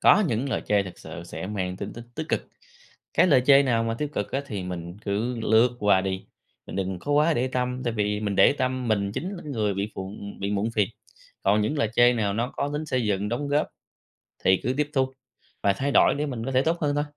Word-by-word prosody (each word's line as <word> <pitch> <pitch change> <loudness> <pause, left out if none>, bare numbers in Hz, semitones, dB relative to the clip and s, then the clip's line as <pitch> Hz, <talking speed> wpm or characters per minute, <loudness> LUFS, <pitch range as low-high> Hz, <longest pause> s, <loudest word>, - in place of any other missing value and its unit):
có 210 - +6
những 120 +5 -1
lời - - 0
chê 105 -1 +3
thực 95 -2 -10
sự 85 - -8
sẽ 95 - -6
mang 95 -3 -3
tính 100 - -6
tích 120 0 -9
tích 160 +1 -5
cực. - - -1 0.7
Cái - - +5
lời 135 -7 +5
chê 140 0 +8
nào 115 -4 +1
mà 115 - -1
tiêu 150 +5 -2
cực 105 - -2
á 135 - +1
thì 100 -6 -4
mình 90 +1 -6
cứ 115 +4 -1
lướt 115 +3 +3
qua 100 -2 +4
đi, 95 0 -3 0.4
mình - - -7
đừng 95 -1 -2
có 145 +10 -3
quá 150 +2 +4
để 130 +2 0
tâm, 125 0 -2
tại 120 - 0
vì 105 -1 0
mình 100 -2 -2
để 95 - +7
tâm, 130 -2 -1
mình 100 -2 +1
chính 180 - -3
là 175 - -9
người 110 -9 -1
bị 100 +2 -2
phụ 95 +1 -6 0.3
bị 100 - -1
muộn 105 +2 0
phiền, 105 -4 +1 0.5
còn 105 +2 +3
những 145 +8 -1
lời 115 - +2
chê 120 +1 +6
nào 105 -4 0
nó 120 +3 -1
có 145 - -1
tính 150 +1 -3
xây 130 -3 0
dựng 100 0 0
đóng 135 +6 -2
góp 145 +1 +2 0.8
thì 95 0 +6
cứ 125 +3 0
tiếp 150 0 0
thu 130 -1 +1 0.5
và 100 - +4
thay 135 +8 -2
đổi - - +5
để 150 +1 -1
mình 120 -5 -4
có 135 - -2
thể 130 +1 +4
tốt 165 +3 +1
hơn 145 -3 +1
thôi. 145 - +1
115 Hz, 250 wpm, -26 LUFS, 100-135 Hz, 0.8 s, chê